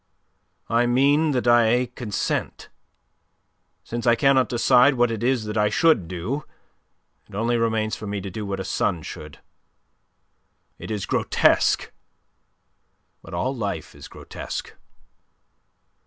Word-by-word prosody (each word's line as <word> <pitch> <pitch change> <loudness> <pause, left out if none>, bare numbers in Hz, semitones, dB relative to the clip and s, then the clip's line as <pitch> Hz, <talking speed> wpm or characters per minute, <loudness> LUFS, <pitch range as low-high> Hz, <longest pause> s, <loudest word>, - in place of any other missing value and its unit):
"I 120 +1 +2
mean 140 +6 +3
that 125 -1 -1
I 120 +1 +4
consent. 105 -5 -3 1.1
Since 120 +1 -5
I 120 - +6
cannot 130 +1 +3
decide 125 +3 +4
what 120 -1 +2
it 115 -2 -4
is 125 -2 0
that 105 +1 -2
I 105 0 +3
should 155 - +3
do, 95 - -4 0.9
it - - -11
only 115 +3 0
remains 110 -2 0
for 105 - -8
me 100 0 -3
to 95 0 -7
do 105 +4 -5
what 100 -1 -4
a - - -4
son 80 -3 -1
should. 75 0 -9 1.4
It - - -8
is 105 -3 -3
grotesque; - - +2 1.3
but - - -9
all 130 +10 -1
life 100 -9 -4
is - - -12
grotesque." - - -7
115 Hz, 130 wpm, -23 LUFS, 105-125 Hz, 1.4 s, I